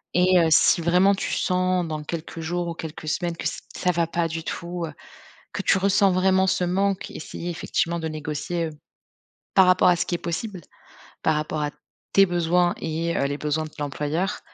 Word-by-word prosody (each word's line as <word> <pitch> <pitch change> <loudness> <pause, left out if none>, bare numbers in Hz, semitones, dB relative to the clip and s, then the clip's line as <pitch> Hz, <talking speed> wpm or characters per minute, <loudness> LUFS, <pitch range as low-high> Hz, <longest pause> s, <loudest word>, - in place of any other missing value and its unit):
et 180 +1 +5
heu, 165 - +4
si 155 +2 +5
vraiment 180 +4 +4
tu - - -3
sens 185 -1 +1
dans 155 -1 -4
quelques 165 +1 -6
jours 175 +2 -2
ou 170 - -3
quelques 160 -1 -7
semaines 170 +1 -1
que - - -3
ç - - -4 0.2
ça 180 - +1
va 170 -1 +1
pas 170 0 0
du 165 0 -5
tout, 170 +1 -4
heu, 155 - -8 0.6
que - - -3
tu - - +3
ressens 200 +1 +3
vraiment 190 +1 +3
ce 180 - +1
manque, 195 +2 0
essayer 170 +2 -6
effectivement 170 0 -1
de 160 - -3
négocier, 155 +2 -3
heu, - - -4 0.8
par 190 -1 +6
rapport 185 0 +5
à 180 - +5
ce 170 - -1
qui 175 - 0
est - - -1
possible, 175 +3 -4 0.6
par 155 - +2
rapport 150 0 -2
à 150 - 0 0.4
tes 195 - +7
besoins 175 0 +2
et 165 +1 -2
heu, - - +1
les 145 +1 -2
besoins 150 +1 -1
de - - -8
ton 150 - -6
employeur, 150 +7 -2
170 Hz, 205 wpm, -24 LUFS, 160-180 Hz, 0.8 s, tes